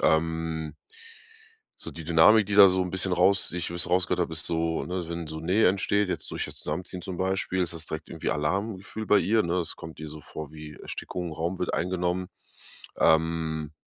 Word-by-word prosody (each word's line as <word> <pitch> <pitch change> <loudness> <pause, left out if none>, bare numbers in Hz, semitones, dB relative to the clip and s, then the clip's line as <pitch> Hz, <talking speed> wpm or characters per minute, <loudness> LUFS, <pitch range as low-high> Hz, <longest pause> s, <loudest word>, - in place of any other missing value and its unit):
ähm. 80 -1 0 1.1
So - - -7
die 85 - -8
Dynamik, 85 +7 +6
die 100 +1 -2
da 100 -1 +10
so 95 0 +1
'n 90 - -3
bisschen 95 0 +1
raus 95 +2 +4
die 90 - -4
ich 85 - -3
wie 85 - -6
ich 85 - 0
es - - -3
rausgehört 90 0 +2
habe, 85 -1 -2
ist 80 - -2
so, 80 -1 0
ne, 90 -1 -3
wenn 85 -1 -4
so 80 +1 -6
Nähe 90 +7 +3
entsteht, 100 +2 +1
jetzt - - -3
durch - - -2
das - - -10
Zusammenziehen 90 +4 -4
zum 90 0 -6
Beispiel, 95 0 0
ist 85 -1 -1
das 80 -1 -6
direkt 80 0 -6
irgendwie 80 - -3
Alarmgefühl 95 +7 -2
bei 105 - +5
ihr, 105 +4 +3
ne? 85 +1 -1
Es 85 - -2
kommt 80 -1 -10
ihr 80 - -6
so 75 0 -10
vor 75 0 -8
wie 75 -1 -9
Erstickung, 85 +2 -6
Raum 85 +4 -3
wird 90 - -2
eingenommen, 90 0 -1 0.7
ähm, 80 -1 +2
85 Hz, 210 wpm, -27 LUFS, 80-95 Hz, 1.1 s, da